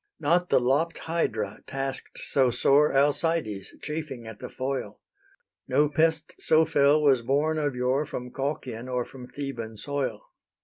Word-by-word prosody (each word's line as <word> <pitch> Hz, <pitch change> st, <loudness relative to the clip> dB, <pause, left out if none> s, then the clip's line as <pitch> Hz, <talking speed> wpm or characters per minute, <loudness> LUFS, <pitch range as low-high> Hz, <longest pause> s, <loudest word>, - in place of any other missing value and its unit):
Not 170 Hz, +4 st, +2 dB
the -, -, +5 dB
lopp'd 145 Hz, +6 st, +1 dB
Hydra 110 Hz, -12 st, -2 dB
task'd 135 Hz, 0 st, -4 dB
so 130 Hz, -2 st, +2 dB
sore 140 Hz, +5 st, +4 dB
Alcides, 145 Hz, -, +1 dB
chafing 150 Hz, -6 st, -5 dB
at 110 Hz, -1 st, -9 dB
the -, -, -7 dB
foil: 135 Hz, +1 st, -4 dB, 0.7 s
No 150 Hz, 0 st, +3 dB
pest 160 Hz, +1 st, +1 dB
so 160 Hz, 0 st, +4 dB
fell 145 Hz, 0 st, +4 dB
was 135 Hz, -4 st, +5 dB
born 145 Hz, +6 st, +1 dB
of 145 Hz, -3 st, -1 dB
yore 130 Hz, +4 st, +1 dB
From 125 Hz, 0 st, -6 dB
Colchian 130 Hz, -4 st, -4 dB
or 125 Hz, -1 st, 0 dB
from 125 Hz, -2 st, -11 dB
Theban 120 Hz, -7 st, -6 dB
soil. 135 Hz, -4 st, -3 dB
140 Hz, 145 wpm, -27 LUFS, 125-155 Hz, 0.7 s, the